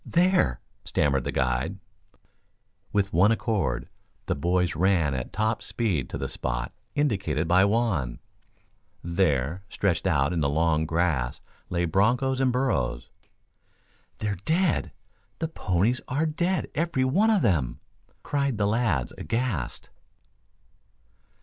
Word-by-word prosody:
There!" 175 - +2 0.2
stammered 70 -3 +1
the - - -1
guide. 65 -1 0 1.1
With 100 -1 0
one 95 +6 +5
accord 115 -3 -1 0.4
the - - 0
boys 90 +4 0
ran 85 -4 +2
at 65 -2 -4
top 110 +3 0
speed 95 - -1
to - - -4
the 70 - -3
spot - - -3 0.2
indicated 95 - 0
by 90 +3 +5
Juan. 100 - 0 0.9
There, 85 -1 0
stretched 95 -3 0
out 75 -2 +2
in 85 - 0
the 70 -3 +1
long 80 +1 +1
grass 80 -8 0 0.3
lay 85 -1 0
bronchos 125 +10 +2
and 130 -1 +3
burros. 125 - -1 1.1
"They're 100 -3 -3
dead, 170 - +1 0.5
the 160 - -2
ponies 110 - 0
are 145 +5 0
dead, 175 +4 -1
every 155 -5 0
one 195 +12 +3
of 215 -4 +3
them!" 80 - +1 0.4
cried 140 -4 0
the 100 - +1
lads 105 - 0
aghast. 115 - -2
95 Hz, 125 wpm, -26 LUFS, 75-125 Hz, 1.1 s, one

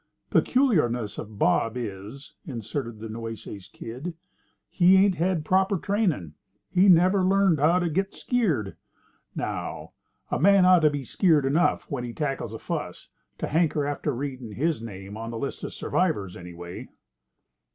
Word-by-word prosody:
"Peculiarness 150 - +2
of 105 -1 -8
Bob 115 +5 +2
is," 110 +4 -7
inserted 115 -1 -5
the 110 +1 -7
Nueces 110 -3 -7
Kid, 130 - -7 0.5
"he 185 +1 +5
ain't 195 0 +5
had 175 -2 0
proper 190 +3 +2
trainin'. 180 - -1 0.4
He 185 +2 +5
never 185 +2 +5
learned 190 -4 +3
how 160 +5 +4
to 175 -1 0
git 190 +5 -1
skeered. 165 - 0 0.6
Now, - - -4 0.4
a - - 0
man 195 +2 +6
ought 185 -1 +7
to 155 -2 +4
be 145 -2 -4
skeered 155 - +3
enough 155 +7 +2
when 140 -6 -5
he 120 -1 -5
tackles 135 -6 -3
a 110 - -6
fuss - - -5 0.3
to - - -3
hanker 155 -2 +1
after 145 +1 -2
readin' 130 -4 -5
his 155 +2 -1
name 100 -2 -8
on 115 +1 -5
the 115 - -5
list 140 +4 -5
of - - -4
survivors, 105 - -1
anyway." 85 0 -9
145 Hz, 150 wpm, -26 LUFS, 115-180 Hz, 0.6 s, ought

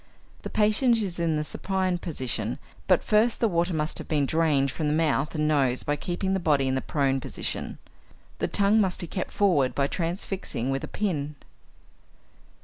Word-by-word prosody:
The - - -6
patient 220 +3 +3
is 190 -6 -2
in 165 -2 +1
the 150 - -1
supine 185 +2 -1
position 125 -9 -3 0.3
but 185 -3 +4
first 220 +2 +2
the 230 - +3
water 175 -2 +1
must 155 -1 -1
have - - -8
been 150 -3 +1
drained 145 -3 +2
from 155 - -2
the 150 - +1
mouth 155 -1 +1
and 150 0 +1
nose 135 -5 +2
by 145 - 0
keeping 180 +5 -2
the 190 - +1
body 145 -6 +2
in 130 - 0
the 130 - 0
prone 135 -2 0
position. - - -4 0.6
The - - 0
tongue 205 +2 +3
must 190 -3 +1
be 180 - -4
kept 180 +2 -4
forward 170 -11 +2
by 140 - +2
transfixing 170 - -3
with 135 0 -2
a - - -4
pin. 150 -8 -2
165 Hz, 185 wpm, -26 LUFS, 140-190 Hz, 0.6 s, but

